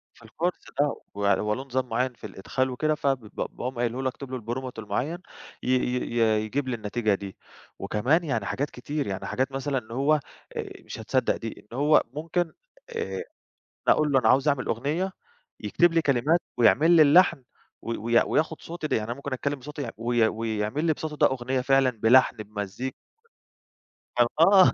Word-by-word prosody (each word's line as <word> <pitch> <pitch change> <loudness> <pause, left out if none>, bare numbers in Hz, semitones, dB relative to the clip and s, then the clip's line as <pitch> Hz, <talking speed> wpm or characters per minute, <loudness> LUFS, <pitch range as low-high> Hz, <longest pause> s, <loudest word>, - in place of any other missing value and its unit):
في - - -19
الكورس 170 +11 -2 0.2
ده، 145 0 +2 0.2
ويعني 100 -1 +2
هو 105 0 0
له 130 +4 -4
نظام 130 -1 -2
معين 125 +2 0
في 110 - -9
الإدخال 115 +7 -2
وكده، 155 +4 0
فب 135 -3 0
ب 110 -3 -16
باقوم 125 +1 -4
قايله 120 +2 -1
له 130 - +2
اكتب 135 0 -9
له 130 -2 -4
prompt 125 +3 -4
المعين، 125 - -2 0.5
ي - - -2
ي 125 -1 0
ي 110 -2 +3
يجيب 135 +5 -2
لي 125 - -1
النتيجة 110 0 0
دي. 100 -1 -8 0.4
وكمان 135 +11 +1
يعني 115 -10 -1
حاجات 145 +7 -2
كتير، 145 +3 -4
يعني 95 -1 -4
حاجات 130 +2 -1
مثلًا 135 +1 -2
إن 115 -2 -6
هو 140 +5 +2 0.7
مش - - -7
هتصدق - - +1
دي، - - -7
إن 120 - -6
هو 150 +2 +5
ممكن 165 +2 -2 0.4
آآ، 455 -1 -3 0.6
أقول 150 -1 +4
له 135 - +5
أنا - - +2
عاوز 135 +3 +4
أعمل 140 -4 +2
أغنية، 155 - -1 0.5
يكتب 165 - +2
لي 165 - +4
كلمات 150 +4 +2 0.2
ويعمل 145 +8 +5
لي 165 -2 +7
اللحن 155 -1 +5 0.4
وي 115 0 -3
وي 115 +2 +3
وياخد 160 0 0
صوتي 165 -2 -5
د - - -2
يعني 110 - +1
أنا 120 - -3
ممكن 140 +1 -6
أتكلّم 140 +2 -2
بصوتي 145 +2 -6
وي 115 - -5
وي 115 0 +2
ويعمل 110 +6 -2
لي 160 - +3
بصوتي 155 0 -5
ده - - +5
أغنية 130 0 -1
فعلًا 135 0 +4
بلحن 120 +1 +4
بمزي 105 +5 -5 1.2
كان 120 -1 +5
آه، 190 +3 +7
130 Hz, 185 wpm, -26 LUFS, 115-150 Hz, 1.2 s, لي